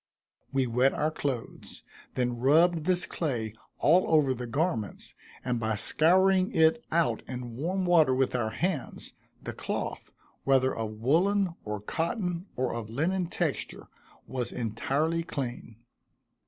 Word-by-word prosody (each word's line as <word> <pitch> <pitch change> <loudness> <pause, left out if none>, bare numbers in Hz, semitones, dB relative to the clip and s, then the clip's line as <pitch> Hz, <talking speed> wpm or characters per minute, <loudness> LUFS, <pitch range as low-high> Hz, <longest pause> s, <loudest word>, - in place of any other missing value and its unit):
We 135 -1 +1
wet 125 +3 +2
our 155 +1 0
clothes, 135 -6 -5 0.3
then 125 -1 0
rubbed 160 +5 +4
this 180 0 +2
clay 120 - -3 0.2
all 175 +5 +4
over 150 -5 +4
the 125 -1 -6
garments, 135 - -2 0.3
and 125 -2 0
by 110 -1 0
scouring 185 - +3
it 160 +9 +4
out 165 0 +2
in 125 -2 -6
warm 180 +8 -1
water 160 -7 +5
with 130 0 +1
our 115 -3 0
hands, 170 +2 -3 0.3
the - - -5
cloth, - - -4 0.3
whether 130 -1 +3
of 110 -1 -3
woollen, 175 - +2
or 105 -1 -4
cotton, 170 - -2
or 125 -1 -1
linen 160 - -1
texture, 170 -4 -3 0.4
was 125 -2 -3
entirely 140 +8 -1
clean. 125 -8 -5
140 Hz, 130 wpm, -28 LUFS, 120-170 Hz, 0.4 s, water